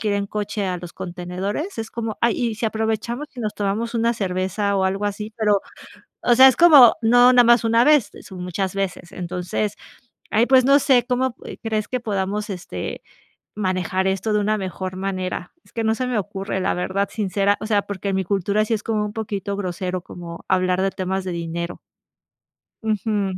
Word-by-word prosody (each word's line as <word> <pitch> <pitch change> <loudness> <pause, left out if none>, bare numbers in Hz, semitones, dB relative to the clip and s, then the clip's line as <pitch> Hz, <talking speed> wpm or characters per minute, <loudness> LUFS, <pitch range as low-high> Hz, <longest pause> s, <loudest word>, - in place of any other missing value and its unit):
que 220 - -1
ir 205 - +1
en 200 0 -1
coche 210 0 -3
que - - -1
a 180 -1 -1
los 175 0 -9
contenedores, 190 - -5
es 225 0 -4
como: 225 -2 -4
"Ay, 235 -1 +3
¿y 235 -3 -1
si 225 - -1
aprovechamos 225 +5 -2
y 245 - -5
nos 210 -2 -3
tomamos 210 +4 -2
una 230 0 +2
cerveza?, 195 0 -1
o 190 - +1
algo 195 +2 -1
así", 210 +2 -4
pero, 210 -3 +2 0.6
o 240 - +4
sea, 260 +2 +9
es 260 - +4
como 295 -9 +8
no 245 +2 +6
nada 245 -1 +7
más 235 0 +5
una 230 +1 +4
vez, 295 -7 +4
son 185 -2 -8
muchas 185 +1 -2
veces. 195 -3 -3
Entonces, 180 +3 -3 0.6
ay, 225 +3 +4
pues, 260 0 +5
no 275 +1 +6
sé, 255 -3 +3
¿cómo 255 +1 +1
p - - -10
crees 215 -1 -1
que 255 - -2
podamos, 205 -2 -2
este, 130 - -6 0.5
manejar 185 -2 -1
esto 195 +3 -1
de 210 - +2
una 215 +1 +1
mejor 185 -1 -5
manera? 185 -2 -4
Es - - -24
que 230 - -2
no 220 0 +2
se 255 +2 -2
me 250 -3 0
ocurre, 195 -1 -3
la - - +1
verdad, 190 +3 -1
sincera 200 -1 +1
o 215 - -4
sea, 205 -2 +2
porque 200 0 -5
en 190 - 0
mi 190 - 0
cultura 200 +3 +1
sí 220 - -4
es 210 - -3
como, 215 -2 -1
un 210 - -4
poquito 205 -2 -3
grosero, 185 -1 -3
como 170 -1 -9
hablar 185 0 +2
de 195 - +1
temas 190 0 -3
de 185 - -3
dinero. 170 +1 -4 1.0
Ujú. 210 -3 -1
205 Hz, 205 wpm, -22 LUFS, 185-225 Hz, 1.0 s, sea